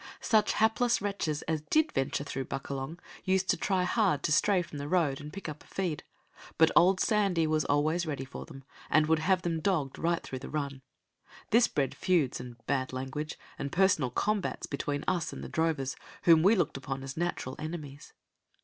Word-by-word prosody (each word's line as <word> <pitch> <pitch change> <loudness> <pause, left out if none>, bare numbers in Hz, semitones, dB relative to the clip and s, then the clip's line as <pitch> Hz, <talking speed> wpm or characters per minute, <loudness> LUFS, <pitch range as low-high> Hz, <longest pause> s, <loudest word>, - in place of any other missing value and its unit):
Such 215 -2 +3
hapless 225 +2 +3
wretches 195 -7 -2
as 160 -1 -1
did 310 - +2
venture 135 +1 -1
through 135 -2 -4
Buckalong 135 +3 -5 0.3
used 190 0 +1
to - - +1
try 190 -2 +1
hard 185 -5 +1
to - - 0
stray 185 +4 +3
from 150 -3 -8
the 140 - -4
road 150 -5 +1
and 150 +1 -8
pick 195 +1 -7
up 150 -1 -7
a - - -22
feed, 180 -6 -3 0.5
but 160 0 +5
old 185 +2 +6
Sandy 200 -7 +2
was 155 -1 +1
always 155 +4 +1
ready 140 -3 -3
for 135 - -8
them, 135 -4 -11 0.3
and 155 0 +4
would 160 +1 +2
have 180 +2 +2
them 165 -2 -1
dogged 160 -7 -1
right 170 0 0
through 130 - -6
the - - -8
run. 140 -3 -3 0.7
This 235 +2 +6
bred 135 -2 -1
feuds, 165 -8 +1
and 125 -1 -9
bad 130 -2 0
language, 135 +4 -4 0.2
and 140 - -3
personal 185 -8 +3
combats 205 - -1
between 145 0 -3
us 170 -2 0
and - - -7
the - - -6
drovers, 160 -5 0 0.3
whom 165 -2 +7
we 200 +7 +5
looked 175 -8 0
upon 135 0 -5
as 135 0 -6
natural 165 -6 -2
enemies. 150 -3 -7
160 Hz, 195 wpm, -30 LUFS, 140-185 Hz, 0.7 s, whom